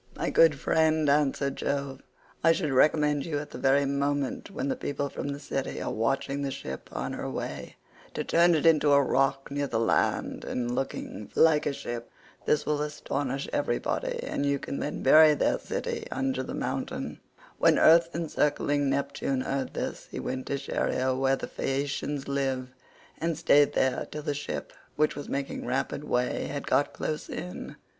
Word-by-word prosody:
"My - - -2
good 155 -4 +5
friend," 160 -1 +2
answered 140 -1 +2
Jove, 140 -1 -2 0.4
"I 165 +1 +6
should 160 -3 -1
recommend 150 +1 +3
you 155 -3 -2
at 145 +1 -6
the - - -7
very 140 +1 +3
moment 140 +2 -1
when 200 +7 -3
the 265 - 0
people 145 - -3
from - - -5
the 140 0 -4
city 135 -1 -3
are - - -3
watching 135 +5 -1
the 140 - -1
ship 65 - -7
on - - -3
her - - -4
way, - - -5 0.4
to - - -1
turn 170 0 +4
it 155 - 0
into 150 -3 +5
a 140 - +6
rock 135 0 +1
near 145 0 -1
the 115 -4 -1
land 115 - +1
and 120 -1 -2
looking 125 -5 -4
like 160 -2 +4
a - - +1
ship. 120 -3 -6 0.4
This 150 - +2
will 150 -1 0
astonish 140 -2 -3
everybody, 120 -4 -1
and - - -2
you 140 0 +2
can 140 - -5
then 150 - -3
bury 155 -1 +7
their - - +1
city - - -4
under 135 0 -1
the 130 - -5
mountain." - - -3 0.4
When - - +5
earth 165 +1 +6
encircling 145 -3 +1
Neptune 140 -1 -1
heard 135 0 -3
this - - -4
he - - -6
went 130 0 -4
to 140 - -1
Scheria 130 -1 0
where 135 +1 +2
the - - -5
Phaeacians 140 +1 -2
live, 135 -2 -1 0.5
and 165 -1 -1
stayed 145 -3 +4
there 130 -1 +1
till 150 0 -6
the 145 - -1
ship, 145 +1 -5 0.2
which 155 +1 +2
was 145 - -7
making 140 -2 -3
rapid 130 +3 -1
way, 125 -4 0
had - - -4
got - - +2
close 155 -1 -4
in. 180 - -6
140 Hz, 180 wpm, -28 LUFS, 135-150 Hz, 0.5 s, bury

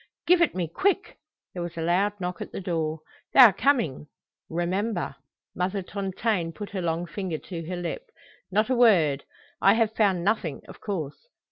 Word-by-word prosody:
"Give 360 0 +5
it 340 - +3
me, 180 -3 -1
quick!" 390 - 0 0.3
There 180 - -5
was 170 -1 -6
a - - -2
loud 200 +5 +1
knock 180 -1 -4
at - - -6
the - - -5
door. 160 -4 -2 0.3
"They - - +4
are 230 -6 +10
coming. 225 - +1 0.4
Remember!" 175 0 -2 0.4
Mother 190 +2 -1
Tontaine 190 -2 -2
put 205 +5 -7
her 195 -2 -3
long 170 0 -1
finger 175 -1 -4
to 165 -1 -7
her 180 - -3
lip. 175 - -5 0.4
"Not 215 +6 +1
a - - +3
word! 175 - +4 0.4
I 195 +2 +6
have 225 -1 +2
found 195 -5 +2
nothing, 185 -7 -1
of - - -13
course. 170 - -5
185 Hz, 175 wpm, -26 LUFS, 170-215 Hz, 0.4 s, are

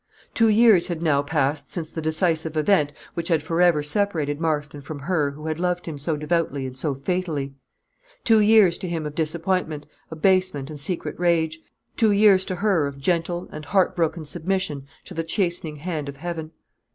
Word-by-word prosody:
Two 225 -1 +4
years 215 -4 +5
had 170 -3 -3
now 145 -4 +3
passed 145 0 -1
since 165 -3 -5
the 160 - -5
decisive 160 0 0
event 155 -3 +3 0.2
which 170 -1 -3
had 160 -4 +1
forever 165 -2 +3
separated 155 -3 -1
Marston 150 -3 -2
from 145 +2 -7
her 155 -2 0
who 150 +2 -10
had 160 0 -3
loved 180 0 -1
him 160 - -5
so 150 +2 -1
devotedly 150 -3 -1
and 130 -1 -6
so 135 +2 -1
fatally; 145 -2 -2 0.7
two 225 -1 +5
years 210 -5 +5
to 185 - -4
him 165 -3 -3
of 150 - -5
disappointment, 160 -1 -1 0.2
abasement, 160 -3 +1
and 150 - -6
secret 165 +4 -2
rage; 160 -2 +1 0.4
two 225 - +4
years 200 -2 +5
to 185 - -3
her 180 -6 +1
of 140 0 -7
gentle 175 +4 -1
and 155 0 -8
heart 185 +2 +2
broken 165 -2 -1
submission 160 -3 -2 0.2
to - - -9
the 165 - -2
chastening 170 -2 -2
hand 150 -2 -4
of 140 - -9
heaven. 165 0 -5
165 Hz, 180 wpm, -23 LUFS, 150-180 Hz, 0.7 s, years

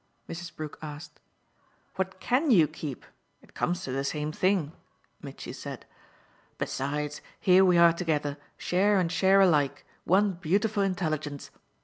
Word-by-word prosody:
Mrs. 165 0 -7
Brook 155 -1 -7
asked. 150 0 -9 0.8
"What 190 0 -3
CAN 270 +5 +1
you 175 - +6
keep? 150 -4 -7 0.4
It - - -21
comes 175 +1 -1
to 130 - -4
the 135 +1 -1
same 150 +2 -2
thing," 185 -3 +1 0.5
Mitchy - - -8
said. - - -8 0.7
"Besides, 145 +2 -3 0.2
here 185 0 +5
we 180 -2 +4
are 170 -1 +7
together, 150 -4 -1 0.2
share 195 +3 +2
and 170 -2 0
share 190 +2 +4
alike 150 -7 +2 0.2
one 200 +3 +3
beautiful 200 +5 0
intelligence. 155 -7 -2
170 Hz, 135 wpm, -28 LUFS, 150-190 Hz, 0.8 s, are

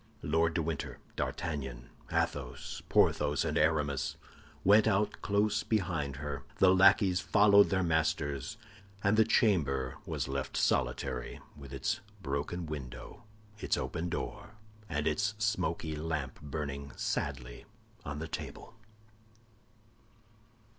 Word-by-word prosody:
Lord 80 +2 +2
de 85 - +1
Winter, 80 -2 -3 0.2
D'Artagnan, 65 -7 -4 0.2
Athos, 65 -2 -2
Porthos, 75 0 +3
and - - -1
Aramis, 70 -4 +1 0.5
went 105 +3 +6
out 105 0 +1
close 105 +1 +2
behind 85 - -1
her. 70 -1 -4 0.2
The 95 -1 +6
lackeys 95 -1 +5
followed 100 0 +6
their 95 -1 +1
masters, 80 -4 0 0.5
and 100 +2 +4
the 110 - +6
chamber 75 - +2
was - - -2
left 65 0 -3
solitary, 60 0 0 0.2
with 70 -2 -11
its 70 -2 -1 0.2
broken 80 +2 -3
window, 65 -3 -8 0.3
its - - 0
open 85 +2 -3
door, 100 +5 -5 0.3
and 75 0 -1
its 100 +7 +1
smoky 85 -7 -1
lamp 75 -4 -3
burning 70 -1 -5
sadly - - -3 0.4
on 75 0 -5
the 80 +2 -4
table. - - -7
80 Hz, 115 wpm, -32 LUFS, 70-95 Hz, 0.5 s, went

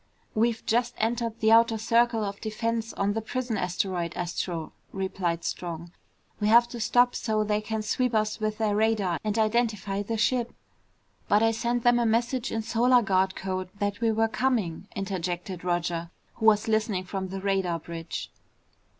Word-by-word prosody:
"We've 230 +1 +1
just 240 +2 +1
entered 230 0 -1
the 220 0 +4
outer 230 0 +5
circle 230 +1 +2
of 200 0 -5
defense 225 +1 -2
on 200 +1 0
the 225 - -2
prison 245 +1 -3
asteroid, 180 -2 -2
Astro," 175 -2 -3 0.2
replied 185 -3 -2
Strong. 170 -1 -5 0.5
"We 210 - +1
have 235 +2 +6
to 240 - -7
stop 245 +2 +3
so 215 -2 0
they 210 0 0
can 220 0 -3
sweep 250 +2 0
us 215 0 0
with 215 0 -1
their 215 -2 +1
radar 210 -5 +1
and 215 0 -1
identify 215 -3 +1
the 225 +2 -3
ship." 240 +1 +1 0.7
"But 210 +2 +4
I 225 - +4
sent 235 +1 -1
them 240 0 +5
a 235 - +2
message 235 +2 0
in 225 0 -2
Solar 240 +2 +3
Guard 190 -2 +1
code 185 -1 -3
that 205 +1 -2
we 230 -1 +3
were 225 +1 +2
coming," 220 -8 -1
interjected 185 -2 -3
Roger 175 -1 -1 0.2
who 220 - 0
was 210 -1 +4
listening 215 -4 +1
from 190 0 -4
the 195 +1 -5
radar 190 -3 0
bridge. 165 0 -6
215 Hz, 170 wpm, -27 LUFS, 190-230 Hz, 0.7 s, have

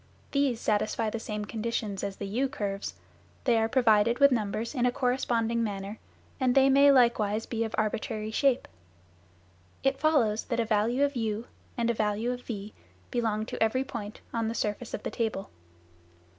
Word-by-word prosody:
These 280 -5 +1
satisfy 215 +1 0
the 230 - -3
same 210 -1 -4
conditions 215 -2 -3
as 200 -1 -3
the 200 - -5
u 245 +7 0
curves, 200 -7 -4 0.5
they 235 -3 +3
are 225 0 +1
provided 230 -2 +4
with 280 0 +6
numbers 225 0 -1
in 250 -3 +2
a - - +2
corresponding 235 -2 0
manner, 200 0 -4 0.4
and 255 -2 +2
they 270 0 +6
may 280 +1 +7
likewise 225 -4 +3
be 230 -1 -2
of 225 - -3
arbitrary 215 0 -2
shape. 270 +2 +2 1.2
It 270 0 +1
follows 245 -9 +2
that 235 - -2
a 230 - +2
value 225 +5 +2
of 285 -1 +1
u 225 -1 -2 0.3
and 235 0 +2
a - - -1
value 215 +2 0
of 250 0 -5
v 210 -3 -6 0.4
belong 220 -3 0
to - - -7
every 225 +4 +2
point 230 -6 -7
on 230 -1 0
the 225 - -2
surface 215 +2 -2
of - - -8
the - - -3
table. 220 -4 -2
230 Hz, 175 wpm, -28 LUFS, 215-250 Hz, 1.2 s, may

